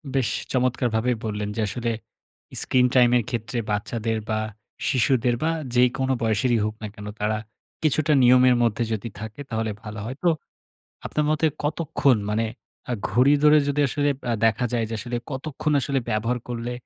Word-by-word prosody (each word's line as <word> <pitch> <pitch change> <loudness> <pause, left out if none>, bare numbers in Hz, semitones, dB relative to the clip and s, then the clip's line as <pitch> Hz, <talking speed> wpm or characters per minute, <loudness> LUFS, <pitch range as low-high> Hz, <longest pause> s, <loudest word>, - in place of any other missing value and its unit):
বেশ 130 -4 +2 0.2
চমৎকারভাবেই 125 -2 +1
বললেন 105 -1 -2
যে 110 - -1
আসলে 115 +1 -2 0.7
স্ক্রিন-টাইমের 125 -1 +4
এর - - -19
ক্ষেত্রে 115 -1 -3
বাচ্চাদের 110 +2 -1
বা 110 0 +1 0.5
শিশুদের 125 -1 +2
বা 165 - +2 0.2
যেইকোন 125 +2 +2
বয়সেরই 115 +1 +2
হোক 110 0 -3
না 105 - -4
কেন। 105 -1 -9
তারা 110 +1 0 0.5
কিছুটা 155 0 +2
নিয়মের 125 0 +6
মধ্যে 115 +1 +1
যদি 110 +2 -4
থাকে 110 +6 -7
তাহলে 110 -1 -1
ভালো 105 0 -7
হয়। 130 +4 -5
তো 175 - +5 0.8
আপনার 150 - 0
মতে 155 +1 +2 0.2
কতক্ষণ 145 -4 +2
মানে 110 +2 +1 0.5
আ - - +1 0.2
ঘড়ি 130 +7 +5
ধরে 150 0 +7
যদি 145 +1 +1
আসলে 145 +1 0 0.2
অ্যা 120 - +1
দেখা 115 +3 +1
যায় 115 -2 +1
যে 115 - -4
আসলে 120 0 -3
কতক্ষণ 150 +3 -2
আসলে 140 0 0
ব্যবহার 115 +3 0
করলে, 120 0 -3
120 Hz, 160 wpm, -24 LUFS, 110-130 Hz, 0.8 s, ধরে